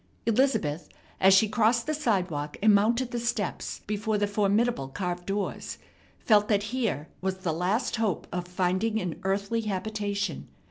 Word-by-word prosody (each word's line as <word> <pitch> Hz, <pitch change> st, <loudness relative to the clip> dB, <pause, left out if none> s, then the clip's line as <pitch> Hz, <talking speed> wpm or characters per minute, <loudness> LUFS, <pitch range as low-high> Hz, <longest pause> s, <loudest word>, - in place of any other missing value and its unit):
Elizabeth, 225 Hz, -, +1 dB, 0.3 s
as 190 Hz, -, +6 dB
she 195 Hz, +3 st, +6 dB
crossed 230 Hz, +2 st, +2 dB
the 310 Hz, -, -1 dB
sidewalk 180 Hz, -, -1 dB
and 215 Hz, -1 st, +7 dB
mounted 235 Hz, +5 st, +2 dB
the 240 Hz, -, -2 dB
steps 230 Hz, -4 st, -2 dB
before 210 Hz, +1 st, -1 dB
the 205 Hz, -, +2 dB
formidable 205 Hz, -, +1 dB
carved 175 Hz, +4 st, -4 dB
doors, 200 Hz, 0 st, -3 dB, 0.4 s
felt 210 Hz, -2 st, +3 dB
that 205 Hz, -2 st, +2 dB
here 225 Hz, -, -1 dB
was 190 Hz, 0 st, -1 dB
the 185 Hz, -4 st, -2 dB
last 185 Hz, +10 st, 0 dB
hope 220 Hz, -5 st, -1 dB
of 180 Hz, 0 st, -3 dB
finding 185 Hz, +5 st, 0 dB
an 180 Hz, -5 st, -4 dB
earthly 200 Hz, +4 st, 0 dB
habitation. 205 Hz, -3 st, -3 dB
205 Hz, 150 wpm, -27 LUFS, 185-225 Hz, 0.4 s, and